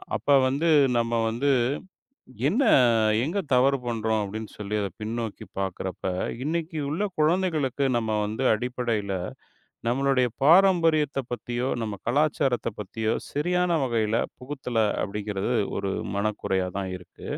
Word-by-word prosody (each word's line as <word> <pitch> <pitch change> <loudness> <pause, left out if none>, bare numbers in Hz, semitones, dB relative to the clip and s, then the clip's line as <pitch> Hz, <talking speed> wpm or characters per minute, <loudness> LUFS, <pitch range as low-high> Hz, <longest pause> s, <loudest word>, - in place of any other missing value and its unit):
அப்ப - - -6 0.2
வந்து, 145 +6 +1 0.3
நம்ம 115 0 0 0.2
வந்து, 135 +5 +1 1.0
என்ன 230 - +2 0.6
எங்க 175 +8 -1
தவறு 135 +2 +4
பண்றோம் 110 -2 0
அப்டின்னு 110 +2 -6
சொல்லி, 105 0 -4
அத 100 - -1
பின்னோக்கிப் 110 -2 -5
பாக்கறப்ப. 95 -1 -4 0.4
இன்னைக்கு 160 +2 -2
உள்ள 165 +8 -1 0.2
குழந்தைகளுக்கு 155 -5 +1
நம்ம 110 -2 -1
வந்து 110 +5 -3
அடிப்படையில, 115 -4 -2 0.8
நம்மளுடைய 130 0 +2 0.2
பாரம்பரியத்த 165 -5 +4
பத்தியோ, 120 +1 -2
நம்ம 105 -2 -3
கலாச்சாரத்த 140 -3 +1
பத்தியோ 110 +2 -2 0.2
சரியான 180 +4 +1
வகையில 115 -2 0 0.2
புகுத்தல 130 -3 -4 0.2
அப்படிங்கிறது 105 +2 -3 0.3
ஒரு 95 -1 -2 0.2
மனக்குறையா 100 -3 -1
தான் 95 -1 -3
இருக்கு. 90 - -13
120 Hz, 115 wpm, -26 LUFS, 110-145 Hz, 1.0 s, தவறு